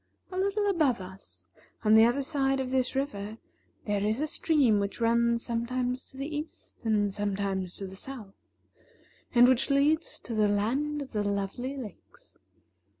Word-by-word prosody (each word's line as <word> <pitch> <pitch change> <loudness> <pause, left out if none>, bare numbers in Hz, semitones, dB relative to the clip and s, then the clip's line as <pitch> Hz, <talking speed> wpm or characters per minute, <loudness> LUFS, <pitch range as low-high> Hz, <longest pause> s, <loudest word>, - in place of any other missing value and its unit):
A - - -6
little 400 +2 +1
above 310 - +2
us, 190 +1 -12 0.4
on 215 -1 +4
the 220 +1 +8
other 250 +4 +1
side 270 -2 +1
of 260 -1 -3
this 260 0 0
river, 220 -6 -3 0.5
there 205 -1 0
is 215 +4 0
a 305 - +1
stream 290 -8 +2
which 200 +3 -3
runs 235 0 +2
sometimes 250 +2 -2
to 265 - -14
the 290 +2 -4
east 305 +2 -9
and 210 -3 +1
sometimes 195 -3 -2
to 195 - -5
the 190 0 -9
south, 215 -3 -9 1.0
and 240 +1 +8
which 260 +1 +3
leads 295 +4 +2
to 235 - -6
the 215 -1 +3
Land 270 +9 0
of 270 - -13
the 210 - -1
Lovely 205 +7 -2
Lakes. 260 - -11
240 Hz, 165 wpm, -29 LUFS, 205-275 Hz, 1.0 s, the